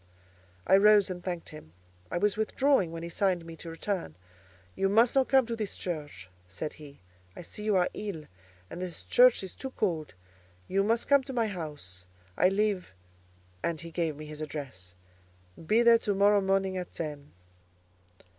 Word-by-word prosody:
I 190 - +6
rose 205 -1 +5
and 180 -1 -7
thanked 175 -3 -4
him. 120 - -12 0.4
I - - -2
was 205 +2 +1
withdrawing 220 - +2
when 165 0 -6
he 170 - -5
signed 180 -1 0
me 165 0 -9
to 165 - -8
return. 165 - -3 0.6
"You 195 0 +1
must 230 +4 +4
not 265 -1 +3
come 265 -2 +5
to 230 0 -3
this 215 -3 -5
church," 145 - -5 0.2
said 95 - -5
he: 140 -6 -13 0.3
"I - - -8
see 210 - -10
you 210 -2 +2
are 180 -1 +3
ill, 195 -7 -5 0.4
and 175 - -8
this 180 -2 -6
church 250 -4 +5
is 190 - -7
too 265 - -6
cold; 170 - -2 0.5
you 195 +1 +1
must 230 +3 +1
come 280 -1 +5
to 270 - -6
my 235 -2 +1
house: 145 - -6 0.3
I 180 - +4
live——" 195 - -1 0.7
(and 165 -2 -1
he 165 +1 -7
gave 165 -2 -1
me 155 +1 -9
his 150 0 -9
address). 130 - -7 0.7
"Be 220 +8 +3
there 235 -1 +7
to 205 -3 -1
morrow 200 +1 +4
morning 190 -1 +1
at 180 -1 -6
ten." 150 -3 -6
185 Hz, 180 wpm, -29 LUFS, 155-210 Hz, 0.7 s, there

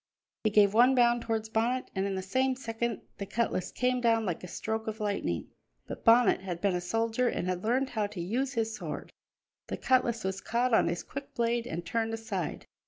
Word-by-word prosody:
He - - +5
gave 205 -1 +5
one 245 +4 +6
bound 240 -1 +4
towards 225 -1 -2
Bonnet, 235 +4 0
and 190 0 0
in 195 - -2
the 190 - -3
same 260 +7 +1
second 235 -2 -3 0.2
the 200 - -4
cutlass 210 -4 -1
came 250 0 0
down 225 -2 +3
like 175 -3 -3
a - - -6
stroke 220 +4 -3
of 220 +1 -4
lightning. 200 - -2 0.3
But - - -8
Bonnet 230 -3 +5
had 180 -3 -4
been 200 0 +1
a 180 - -1
soldier 225 +6 0
and 185 - -1
had 185 0 -2
learned 260 +4 +1
how 215 -3 0
to 205 -3 -8
use 245 +10 -1
his 225 -2 -1
sword; - - -6 0.6
the - - -4
cutlass 240 -3 +2
was 190 0 -2
caught 240 +2 0
on - - +5
his 170 +1 -2
quick 280 0 -8
blade 235 0 0
and 170 -2 -4
turned 225 +3 -1
aside. 205 -8 -4
225 Hz, 210 wpm, -30 LUFS, 195-240 Hz, 0.6 s, one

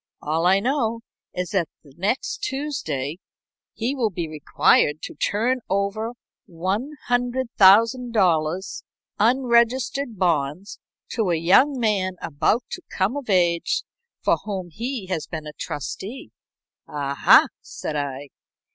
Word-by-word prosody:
"All 160 +3 0
I 190 +2 +5
know 230 -1 0 0.3
is 180 +1 -4
that 185 -6 0
next 185 - -2
Tuesday 175 - -3 0.6
he 240 +4 -1
will 245 -6 0
be 170 -4 -4
required 150 0 +2
to - - -6
turn 240 +5 0
over 200 +4 -1 0.4
$100,000 220 - +2 0.4
unregistered 245 +1 +2
bonds 170 +1 -1 0.3
to 220 -6 -1
a 170 - +2
young 200 - +4
man 200 -5 +1
about 165 - 0
to 360 - -5
come 195 +7 0
of 280 -5 -6
age, 175 -3 +2 0.4
for - - +3
whom 190 -4 -5
he 235 - -4
has 165 -5 -3
been 160 -2 -6
a 150 - -8
trustee." 190 - -6 0.6
"Aha!" 140 -1 +4 0.2
said 155 - -6
I. 140 -1 -4
195 Hz, 115 wpm, -23 LUFS, 165-240 Hz, 0.6 s, I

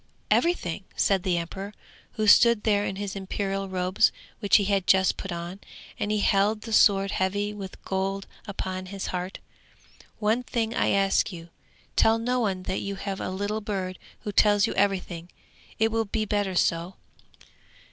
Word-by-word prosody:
'Everything!' 200 - +1
said 195 -2 +2
the 180 -1 0
emperor, 195 +5 -5 0.4
who 215 - -1
stood 235 +1 +6
there 205 -2 +2
in 195 - -3
his 200 0 -4
imperial 195 0 -3
robes 185 +2 +2 0.3
which 205 -3 +3
he 205 - +6
had 195 -2 0
just 190 0 +4
put 195 - -6
on, 170 +2 -5 0.4
and 205 - -1
he 210 -1 +1
held 205 +2 +2
the 225 0 -6
sword 195 -2 +5
heavy 205 +2 -1
with 195 -3 -8
gold 195 +1 -2 0.2
upon 185 -2 -4
his 195 0 -5
heart. 180 +2 -3 0.8
'One 220 +3 +1
thing 230 -2 -2
I - - +1
ask 195 +2 +2
you! 170 -2 -9 0.5
Tell 225 0 +4
no 250 +2 0
one 195 -5 -1
that 185 - -2
you 200 0 -4
have 195 0 -5
a - - -3
little 205 +3 -2
bird 190 -3 -4 0.2
who 210 - -4
tells 205 0 +4
you - - -2
everything; 185 -4 -1 0.5
it 220 0 +2
will 225 0 0
be 215 +1 -2
better 205 -3 -1
so!' 170 +1 +1
195 Hz, 170 wpm, -26 LUFS, 190-210 Hz, 0.8 s, stood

